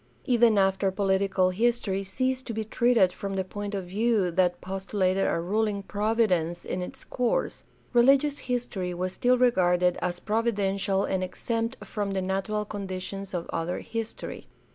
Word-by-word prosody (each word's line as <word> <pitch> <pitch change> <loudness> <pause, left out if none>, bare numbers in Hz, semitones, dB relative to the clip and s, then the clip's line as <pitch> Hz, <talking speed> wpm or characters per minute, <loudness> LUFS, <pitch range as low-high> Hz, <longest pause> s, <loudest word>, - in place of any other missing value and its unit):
Even 235 -4 +4
after 195 0 +3
political 190 -1 +1
history 205 -2 0
ceased 255 +7 -2
to 230 - -4
be 220 - -1
treated 225 -5 +3
from 195 0 -4
the 190 - 0
point 205 +2 -5
of 190 -2 -3
view 205 0 +1
that 180 0 +2
postulated 190 0 0
a 170 - +1
ruling 205 +3 0
Providence 200 -5 0
in 180 - -3
its 265 +9 -6
course, 245 -2 -1 0.3
religious 275 +4 +4
history 195 -8 -2
was 185 +1 -2
still 250 +4 +3
regarded 180 -7 +3
as 175 -1 -2
providential 200 -3 0
and 190 -1 -1
exempt 230 +6 -2
from 205 -2 -3
the 190 - 0
natural 195 +3 -1
conditions 195 -1 -5
of 170 - -3
other 165 +2 -1
history. 225 -1 -6
195 Hz, 150 wpm, -27 LUFS, 185-230 Hz, 0.3 s, Even